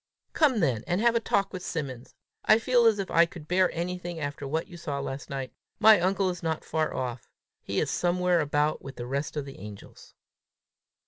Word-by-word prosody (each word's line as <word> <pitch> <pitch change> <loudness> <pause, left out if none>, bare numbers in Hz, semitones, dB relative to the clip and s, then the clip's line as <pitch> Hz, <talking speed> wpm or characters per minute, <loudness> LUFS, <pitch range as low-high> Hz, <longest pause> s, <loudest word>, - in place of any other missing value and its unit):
"Come 305 -5 +4
along 220 - 0
then, 125 -9 +1
and 175 +2 +1
have 235 0 +4
a 230 - +3
talk 200 -3 0
with 185 - -5
Simmons! 135 -9 -5 0.3
I 215 - +6
feel 240 0 +4
as 220 -2 +4
if 195 -2 -4
I 170 0 +5
could 160 -2 -11
bear 185 +1 +3
anything 175 0 -4
after 145 -1 -4
what 160 +4 -1
you 175 - -13
saw 150 -5 -4
last 135 0 -5
night. 135 -2 -5 0.3
My 220 -1 +8
uncle 190 +1 +1
is 175 - -8
not 160 -2 -2
far 155 0 0
off! 125 -2 -4 0.3
He - - -2
is - - 0
somewhere 180 0 +2
about 150 0 +1
with 135 0 -9
the 120 - -6
rest 140 +4 -3
of 145 - -2
the 135 - -10
angels!" 100 0 -12
170 Hz, 210 wpm, -28 LUFS, 140-185 Hz, 0.3 s, My